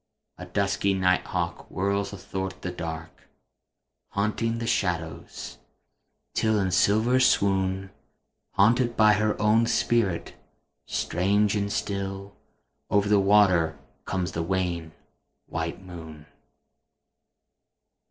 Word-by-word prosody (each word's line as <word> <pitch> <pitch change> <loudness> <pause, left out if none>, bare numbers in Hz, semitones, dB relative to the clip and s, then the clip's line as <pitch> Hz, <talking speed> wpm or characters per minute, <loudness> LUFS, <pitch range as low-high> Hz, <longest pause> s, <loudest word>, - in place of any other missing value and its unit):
A 90 - -8
dusky 100 +1 0
night 90 -1 +2
hawk - - -3
whirrs 100 +1 -1
athwart 95 -1 -5
the 90 - -2
dark, 80 -2 -7 0.8
Haunting 110 +3 0
the 115 - -3
shadows, 85 -8 -3 0.7
till 110 -1 +2
in 95 -2 0
silvern 110 +8 +3
swoon, 95 -4 +2 0.6
Hunted 120 +5 +3
by 110 -1 +6
her 105 0 0
own 110 +2 +3
spirit, 115 -8 +1 0.5
strange 100 +4 +1
and 100 0 -1
still, 100 0 -3 0.5
Over 100 0 +2
the 105 -1 +4
waters 95 -4 +4 0.3
comes 90 -3 -2
the 85 - -3
wan, 85 -2 -2 0.5
white 80 +3 -4
moon. 80 -4 -10
95 Hz, 105 wpm, -26 LUFS, 90-105 Hz, 0.8 s, by